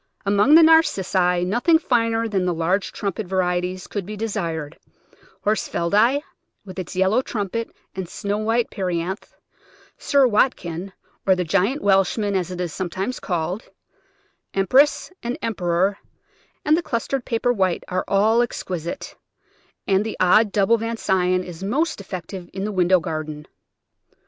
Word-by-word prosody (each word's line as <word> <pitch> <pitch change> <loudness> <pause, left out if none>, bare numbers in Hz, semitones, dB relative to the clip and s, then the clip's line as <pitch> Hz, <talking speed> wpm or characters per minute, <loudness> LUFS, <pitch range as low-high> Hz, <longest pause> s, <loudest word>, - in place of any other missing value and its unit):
Among 205 +9 +5
the 330 - +9
Narcissi 190 - +3
nothing 245 - +3
finer 230 -6 +1
than 195 -4 0
the 180 -2 0
large 180 +5 0
trumpet 200 0 -4
varieties 180 0 -1
could 205 - -4
be 210 +3 -7
desired: 170 -8 -3 0.7
Horsfieldi, 215 +6 +2 0.4
with 190 -1 -8
its 185 0 -6
yellow 190 +6 +3
trumpet 225 -1 -3 0.2
and 185 -3 -5
snow 205 +2 -3
white 225 +2 0
perianth; 185 0 -3 0.6
Sir 280 -2 +3
Wat 245 +2 +3
kin, 175 +3 -6 0.4
or 190 - +6
the 180 - -1
Giant 200 - 0
Welshman, 200 +1 +2
as 180 -2 -1
it 180 -1 -6
is 175 -4 -3
sometimes 190 +6 -3
called; 175 +3 -3 0.9
Empress 260 - +3
and 240 +1 -3
Emperor 190 -2 0 0.7
and 305 +1 +5
the 340 - 0
clustered 255 -1 -2
Paper 245 +1 0
White 190 -5 0
are 185 0 -1
all 215 +4 +3
exquisite; 185 - -4 0.7
and 195 +1 +2
the 220 - -5
old 205 +4 +4
double 210 +3 +3
Von 230 +1 -3
Sion 185 -2 +1
is 175 0 -9
most 285 +6 -1
effective 180 -1 -7
in 190 - -4
the 210 - -2
window 185 -1 +3
garden. 155 -2 -5
195 Hz, 145 wpm, -22 LUFS, 180-230 Hz, 0.9 s, the